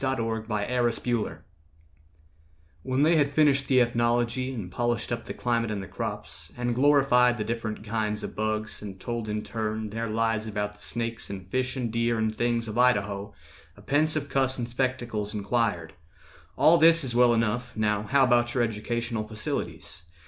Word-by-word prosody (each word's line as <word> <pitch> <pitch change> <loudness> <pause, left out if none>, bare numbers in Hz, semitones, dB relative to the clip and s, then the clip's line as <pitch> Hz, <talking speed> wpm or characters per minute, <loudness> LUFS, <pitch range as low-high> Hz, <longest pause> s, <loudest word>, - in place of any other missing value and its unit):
A 135 0 +1
TALE 115 -2 -1
OF 110 +1 -9
IDAHO 115 -5 -1 1.4
When 130 +2 0
they 165 +2 +4
had 145 -2 +3
finished 140 -2 +3
the 130 -2 +4
ethnology, 120 +2 +1
And 105 -8 -6
polished 120 +3 -1
up 115 -1 -3
the - - -5
climate 115 -2 0
and 100 -2 -3
the - - -8
crops, - - -6
And 120 0 -1
glorified 125 -2 +4
the 105 - -2
different 110 -1 -4
kinds 105 -1 -2
of - - -6
bugs, 110 0 -2
And 100 -2 -8
told 115 0 -4
in 105 0 -2
turn 110 -1 -3
their 115 +2 -3
lies 110 0 0
about 105 -1 -3
the 105 - -21
snakes, 115 -1 -4
And 95 -2 -7
fish 125 +6 -1
and 120 -3 -3
deer 115 0 +1
and 110 0 -1
things, 115 0 0
of 110 +2 -3
Idaho, 100 -5 +1 0.4
A - - -14
pensive 155 +1 +1
cuss 130 -1 +1
in 120 - -2
spectacles 120 -4 -2
inquired, 100 -6 -1 0.6
"All 165 +2 +6
this 165 0 +6
is 125 -3 -1
well 120 0 +5
enough; 115 +1 -1
now 105 -1 +1
how 135 +6 +3
about 120 -2 +2
Your 125 - +3
educational 115 0 -2
facilities? 105 -4 -5
115 Hz, 175 wpm, -27 LUFS, 110-125 Hz, 1.4 s, All